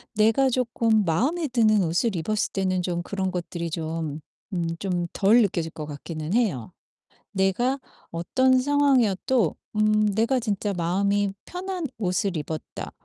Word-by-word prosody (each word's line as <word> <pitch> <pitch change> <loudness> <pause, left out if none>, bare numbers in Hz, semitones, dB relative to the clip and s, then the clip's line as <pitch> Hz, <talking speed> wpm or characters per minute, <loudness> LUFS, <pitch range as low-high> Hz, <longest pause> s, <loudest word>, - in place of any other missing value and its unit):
내가 225 +5 +4
쪼끔 230 -3 +2
마음에 285 - +1
드는 215 -5 +3
옷을 175 +6 0
입었을 210 +6 -1
때는 185 -2 0
좀 175 -1 -2
그런 190 -1 -2
것들이 170 -1 -4
좀 160 -2 -3 0.3
음 170 -2 -1
좀 175 -3 -1
덜 215 +5 +5
느껴질 170 -5 0
것 155 - -6
같기는 155 +3 -5
해요. 185 - 0 0.6
내가 240 +8 +1 0.3
어떤 255 +10 +2
상황이어도 260 - +2 0.2
음 215 0 +3
'내가 230 +5 +2
진짜 205 -3 -1
마음이 195 +3 +1
편한 365 -2 -4
옷을 185 -3 0
입었다.' 155 +1 -6
200 Hz, 270 characters per minute, -25 LUFS, 170-235 Hz, 0.6 s, 덜